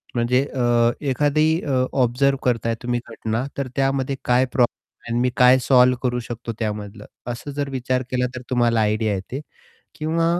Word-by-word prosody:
म्हणजे 125 +3 +2
अ, 120 -1 +3 0.2
एखादी 150 +3 +2 0.2
अ, 130 -3 +1 0.2
ऑब्झर्व्ह 135 +3 +1
करताय 115 -2 0
तुम्ही 120 0 0
घटना, 115 +2 -3
तर 140 -2 -2
त्यामध्ये 135 0 0
काय 125 +1 +3
प्रॉब्लेम 125 -1 +1 0.4
आहे 120 +1 -1
मी 125 - +2
काय 125 +1 +7
सॉल्व्ह 125 -1 +5
करू 125 -1 0
शकतो 120 0 -6
त्यामधलं, 105 -1 -4 0.3
असं 130 +4 -7
जर 140 -1 -2
विचार 130 -1 -1
केला 125 0 +1
तर 125 - -5
तुम्हाला 120 -3 +2
आयडिया 105 0 +1
येते. 125 +9 -5 0.5
किंवा 160 +2 0
125 Hz, 160 wpm, -22 LUFS, 115-135 Hz, 0.5 s, काय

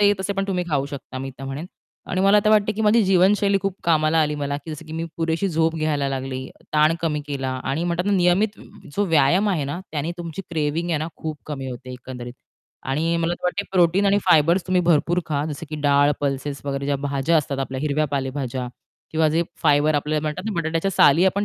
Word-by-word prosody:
ते 205 0 +6
तसे 195 +1 -1
पण 195 0 -1
तुम्ही 180 -2 0
खाऊ 140 -2 +1
शकता 140 -2 -8
मी 135 +1 -5
तर 135 - -7
म्हणेन. 135 +5 -5 0.4
आणि 185 - 0
मला 195 +2 +5
आता 210 +1 +3
वाटत 215 -1 +4
की 220 - -1
माझी 220 +2 +4
जीवनशैली 195 +2 +3
खूप 195 -2 -1
कामाला 160 -1 +3
आली 150 0 0
मला, 145 -1 -2
जसं 155 +1 -7
की 155 - -9
मी 165 +1 -3
पुरेशी 165 +3 0
झोप 160 -1 +1
घ्यायला 150 -3 0
लागली, 130 -1 -4 0.3
ताण 155 +1 +4
कमी 155 -3 -1
केला 135 -2 -3 0.2
आणि 155 +5 -1
म्हणतात 175 0 -1
ना, 205 - +2
नियमित 190 +3 +2 0.4
जो 205 - +2
व्यायाम 165 +5 +3
आहे 170 -8 0
ना, 145 +5 -4
त्याने 155 +2 -2
तुमची 170 +2 -6
क्रेविंग 160 +1 -1
आहे 160 - +1
ना, 155 +2 -3
खूप 155 -2 -5
कमी 135 -3 -5
होते 130 +1 -8
एकंदरीत 125 -1 -8 0.6
आणि 165 +5 +1
मला 170 +1 0
वाटत 200 +3 0
प्रोटीन 180 +2 +3
आणि 200 +1 +4
फायबर्स 170 +3 +4
तुम्ही 185 -1 +2
भरपूर 170 +1 +2
खा 145 -2 -1
जसं 150 +2 -6
की 155 - -4
डाळ, 145 0 +4
पल्सेस 140 0 -2
वगैरे 140 -1 -3
ज्या 140 0 +1
भाज्या 140 +3 0
असतात 140 -2 -1
आपल्या, 130 0 -3
हिरव्या 150 0 +1
पालेभाज्या 135 -2 -3 0.4
किंवा 160 0 +2
जे 160 +2 +2 0.2
फायबर 150 0 +4
आपल्याला 150 +1 0
म्हणतात 155 +5 -3
ना, 220 - -1
बटाट्याच्या 165 +4 -1
साली 165 -1 +5
आपण 200 +2 +1
155 Hz, 215 wpm, -22 LUFS, 140-180 Hz, 0.6 s, ते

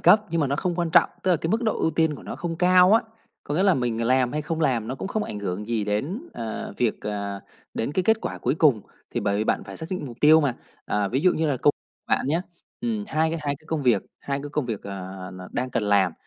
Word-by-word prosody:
cấp 215 - +7
nhưng 165 0 +1
mà 145 - +2
nó 140 +1 0
không 175 +3 -1
quan 170 -1 -1
trọng, - - +5
tức 190 - +2
là 175 - +5
cái 160 - -3
mức 225 +4 +1
độ 220 - 0
ưu 160 - +2
tiên 160 -1 +1
của - - -11
nó - - -6
không 170 -1 -4
cao 180 +2 +6
á, 225 - +6 0.4
có 145 - -3
nghĩa 180 - +2
là 195 -3 +5
mình 120 -4 -1
làm 130 0 +3
hay 150 +1 -1
không 160 +2 -3
làm 120 -7 +1
nó 130 - -2
cũng 135 - -5
không 215 +1 -1
ảnh 105 - -5
hưởng 100 +1 -4
gì 115 -3 0
đến, 135 - -2
ờ, 110 -1 -5
việc, 120 -3 0
à 100 -1 -4 0.3
đến 115 - -2
cái 185 - +1
kết 220 +4 +3
quả - - -4
cuối - - 0
cùng, 150 -8 +4 0.3
thì - - -2
bởi 100 0 0
vì 105 - 0
bạn - - 0
phải - - -9
xác 160 - -5
định 180 -6 -3
mục 120 -3 -9
tiêu 155 +2 +7
mà. 140 -5 +1 0.3
Ờ, 105 -1 0
ví 130 +6 0
dụ 185 +3 +4
như 160 - 0
là 145 -3 +1
cô 145 - +7 0.4
bạn - - +1
nhá, 165 +5 +1 0.4
ừm, 225 -3 -2
hai 160 -2 +1
c - - -4
hai 145 -1 -1
cái 155 - -25
công 160 -2 -2
việc, 120 -6 +3 0.2
hai 140 0 -3
cái 145 - -5
công 150 -1 -1
việc, 110 -4 -4
à, 95 -1 -7
n 95 - -10
đang 125 +1 -2
cần 115 - 0
làm, 100 -4 +3
145 Hz, 285 wpm, -25 LUFS, 110-165 Hz, 0.4 s, cấp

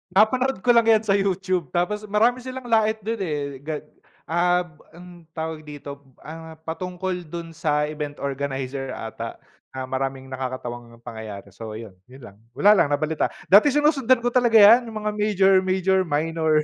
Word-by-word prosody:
napanood 250 +2 +2
ko 245 - +5
lang 230 -1 +4
yan 220 -1 +5
sa 200 -1 +2
YouTube, 185 -4 -1
tapos 210 +4 -1
marami 230 +5 +2
silang 260 +1 -7
lait 220 -1 +3
do'n 225 +1 -3
eh, 145 -7 -3
gag 150 +1 -5 0.4
ab 175 -1 0 0.2
ang 175 -2 -14
tawag 160 -1 -5
dito, 140 -1 -8 0.2
ah, 160 +1 -9
patungkol 180 +1 -4
do'n 170 +1 -7
sa 150 -2 0
event 150 -1 -4
organizer 135 -1 -4
ata, 115 +1 -6 0.4
na 130 - -4
maraming 135 0 -3
nakakatawang 120 -2 -6
pangyayari. 110 -4 -8
So, 110 +2 -8
ayun, 110 -2 -8 0.2
'yon 130 0 -15
lang, 100 0 -13 0.2
wala 205 - +5
lang 180 -8 +4
nabalita 150 +2 0 0.2
dati 210 +9 +8
sinusundan 275 -4 +3
ko 245 - +1
talaga 240 -2 +2
yan, 225 +3 +8
yung 215 -1 -6
mga 210 - 0
major-major, 190 -2 +3
minor 155 0 +1
170 Hz, 160 wpm, -23 LUFS, 140-210 Hz, 0.4 s, dati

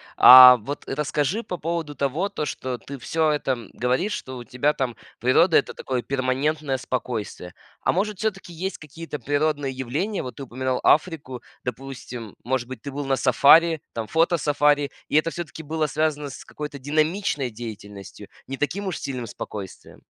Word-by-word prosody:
А 125 0 +11
вот 135 +6 -6
расскажи 150 - -1
по 180 - -5
поводу 165 -2 -3
того, 145 +9 -1
то 150 - -3
что 130 -3 -4
ты 140 +3 -9
всё 160 +4 0
это, 150 -2 0
м, 120 -5 -4
говоришь, 130 - 0
что 130 -1 -6
у 120 - -9
тебя 130 +5 +1
там 125 -4 -2 0.2
природа- 140 +8 +4
это - - 0
такое 130 -2 -3
перманентное 135 +2 -1
спокойствие. 115 -8 -4 0.3
А, - - +2
может, 205 +2 -1
всё-таки 195 -5 -3
есть 190 +4 -4
какие-то 155 0 -8
природные 145 +1 0
явления, 145 - -3
вот 125 - -7
ты 140 - -6
упоминал 130 0 -2
Африку, 150 -6 +1 0.2
допустим, 125 -4 -7
может 125 -1 -1
быть, 130 - -8
ты 140 - -6
был 145 +1 -4
на 135 -1 +1
сафари 150 +5 +5
там, 115 -2 -4
фотосафари, 145 -3 +2 0.2
и - - -2
это 160 +2 +2
всё-таки 165 -1 -7
было 155 +1 -1
связано 150 -1 -1
с - - -10
какой-то 150 -2 -7
динамичной 155 0 0
деятельностью, 105 -3 -9 0.2
не 135 - -4
таким 195 +8 -2
уж 185 - -2
сильным 125 -4 -5
спокойствием? 100 -2 -9
140 Hz, 165 wpm, -24 LUFS, 125-155 Hz, 0.3 s, А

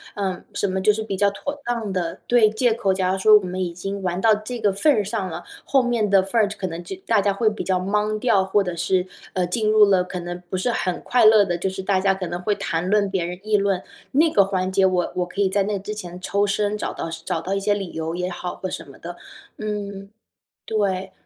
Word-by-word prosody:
呃， 190 -3 -3
什 - - 0
么 190 0 -1
就 210 - +5
是 220 +1 -3
比 205 -3 -3
较 200 +1 +3
妥 285 +8 -6
当 230 -5 -2
的 170 -3 -3
对， 235 -3 +5
借 225 +1 +1
口。 200 -4 0
假 185 -1 +1
如 190 - 0
说 215 +2 +7
我 200 - -2
们 180 +1 -4
已 175 - -3
经 195 +3 -5
玩 180 -1 -2
到 220 +1 +5
这 220 +3 -4
个 205 -3 +2
份 295 +10 +3
儿 215 -7 +2
上 200 -2 -3
了， 170 +1 -6 0.2
后 270 -2 +2
面 235 -4 0
的 195 -1 +5
份 220 +4 +1
儿 205 - +3
可 195 - -4
能 170 -1 -5
就 190 +2 -6
大 220 -3 +3
家 200 0 +2
会 215 +3 0
比 215 0 0
较 185 -1 +1
懵掉， 210 +1 +1
或 195 +1 +2
者 180 -2 -4
是， 180 +2 +1 0.3
呃， 180 -1 +1
进 215 +4 0
入 215 -1 +7
了 190 -2 +3
可 180 0 -6
能 175 0 -6
不 185 - -2
是 240 +6 0
很 180 -5 -1
快 245 -2 +2
乐 215 -2 +7
的 175 - -1
就 190 - -1
是 190 0 -6
大 190 -1 +2
家 195 0 +2
可 190 -1 -4
能 175 +1 -4
会 205 +3 0
谈 165 +2 -2
论 205 0 +3
别 185 -3 0
人， 180 +1 -5
议 215 0 +1
论 195 -2 +1 0.3
那 310 +3 +4
个 200 - +6
环 190 -1 -1
节， 190 0 +2
我 185 -2 +1
我 180 -1 -1
可 200 +3 -3
以 195 - +4
在 200 +1 +1
那 205 +1 -1
之 200 +2 -5
前 180 -4 -8
抽 200 +2 0
身 205 +1 0
找 210 - -3
到 - - -5 0.2
找 165 - -2
到 180 +4 -3
一 195 - 0
些 205 +1 +1
理 195 -4 -5
由 160 +1 -3
也 180 0 -2
好 180 0 -5
或 185 - -5
什 165 - -7
么 135 - -14
的， 175 +1 -8 0.4
嗯， 200 -2 -5 0.6
对。 195 -3 -1
195 Hz, 285 characters per minute, -22 LUFS, 185-210 Hz, 0.6 s, 说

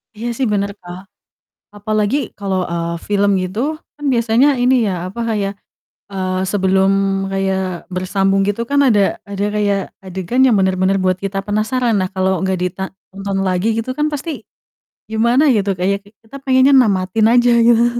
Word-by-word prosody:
Iya 225 +3 -5
sih, 265 - 0
bener, 200 0 0
Kak, 175 0 -9 0.8
apalagi 215 +3 0 0.2
kalau, 195 -2 -1
eee, 170 0 -2
film 205 0 +2
gitu, 185 +3 -5 0.4
kan 295 - -10
biasanya 235 +3 +3
ini 255 +1 +4
ya, 195 - 0 0.2
apa, 200 +6 -7
kayak, 200 -2 -1 0.6
eee, 185 -1 -2
sebelum 190 -1 +2 0.4
kayak 190 -2 -2
bersambung 195 +1 +1
gitu 205 +3 -1
kan, 285 0 +3
ada 225 -6 +4 0.3
ada 200 0 -2
kayak 205 -1 +1 0.2
adegan 190 +7 -1
yang 245 - +4
bener-bener 190 0 +1
buat 185 -1 +2
kita 195 0 -2
penasaran 225 +3 0
lah, 185 - -1
kalau 190 0 +1
nggak 190 -1 0
dita 180 +1 -3
ditonton 195 0 -6
lagi, 185 +2 0
gitu 230 +3 -3
kan, 300 - +1
pasti 295 +3 -4 0.8
gimana 235 +5 +2
gitu, 200 -1 0
kayak 195 +2 +1
ki - - -17
kita 225 +5 -11
pengennya 260 +1 +4
namatin 205 -3 +2
aja, 245 0 +4 0.2
gitu. 235 0 +5
200 Hz, 160 wpm, -17 LUFS, 190-230 Hz, 0.8 s, gitu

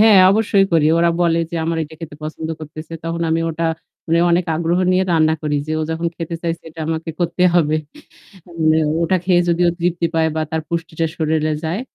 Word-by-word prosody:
হ্যাঁ 215 -2 +7
অবশ্যই 200 -1 +3
করি। 160 -2 +4
ওরা 170 0 +4
বলে 170 -1 +3
যে, - - -6
আমার 165 0 -1
এটা 160 +1 -8
খেতে 155 -3 -8
পছন্দ 155 +1 -5
করতেছে। 155 +1 -9
তখন 165 0 -3
আমি 165 +1 +1
ওটা 165 +1 -3 0.4
মানে 165 0 +2
অনেক 175 +1 +2
আগ্রহ 170 +2 0
নিয়ে 185 +1 +3
রান্না 160 -1 +3
করি। 150 -1 0
যে 155 - -3
ও - - 0
যখন 165 +1 -2
খেতে 165 0 -5
চাইছে 170 -1 -3
এটা 160 +1 -10
আমাকে 160 0 -2
করতে 175 +1 0
হবে। 155 -3 +3 0.7
মানে 160 -2 +1 0.3
ওটা 185 +3 +2
খেয়ে 180 -1 +4
যদি 170 +1 +2
ও - - +4
তৃপ্তি 170 0 +1
পায় 160 0 +3
বা - - 0
তার 160 - -1
পুষ্টিটা 165 -1 -2
শরীরে 155 -1 0
যায় 170 +7 -2
165 Hz, 205 wpm, -19 LUFS, 160-170 Hz, 0.7 s, হ্যাঁ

